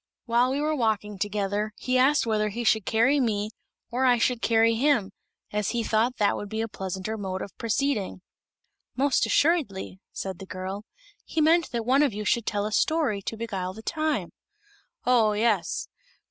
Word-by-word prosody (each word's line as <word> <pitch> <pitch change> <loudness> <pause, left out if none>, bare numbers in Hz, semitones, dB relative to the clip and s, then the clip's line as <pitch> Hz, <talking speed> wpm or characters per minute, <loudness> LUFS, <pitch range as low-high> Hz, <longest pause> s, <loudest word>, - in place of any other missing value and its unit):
While 240 +1 +3
we 270 +2 -1
were 305 +1 0
walking 210 -5 -1
together 205 +1 -1
he 255 - -1
asked 270 +3 +4
whether 215 -2 +1
he 235 +4 -4
should 220 -3 +2
carry 240 +6 +3
me 215 -4 0 0.4
or 250 +2 0
I 250 -2 +5
should 240 0 +1
carry 230 0 +4
him, 235 -5 +2 0.4
as 210 -1 -1
he 235 -1 -1
thought 230 +3 +1
that 205 -1 +2
would 205 - -6
be 220 +1 -3
a 225 - -1
pleasanter 190 +2 -5
mode 190 -1 -3
of 195 - -10
proceeding." 230 -5 -1 0.7
"Most 275 0 +2
assuredly," 265 - +1
said 190 -2 -5
the 190 - -9
girl; 190 +3 -5 0.4
"he 325 - -3
meant 325 +2 +4
that 235 -2 -3
one 265 +4 +4
of 285 -6 +2
you 210 0 -4
should 235 0 +1
tell 205 -1 0
a 215 - -3
story 280 -6 +1
to 225 - -5
beguile 190 -5 -4
the 220 - -10
time." 310 +1 -1 0.7
"Oh 230 -4 +4
yes. 210 -3 0
225 Hz, 180 wpm, -26 LUFS, 205-255 Hz, 0.7 s, I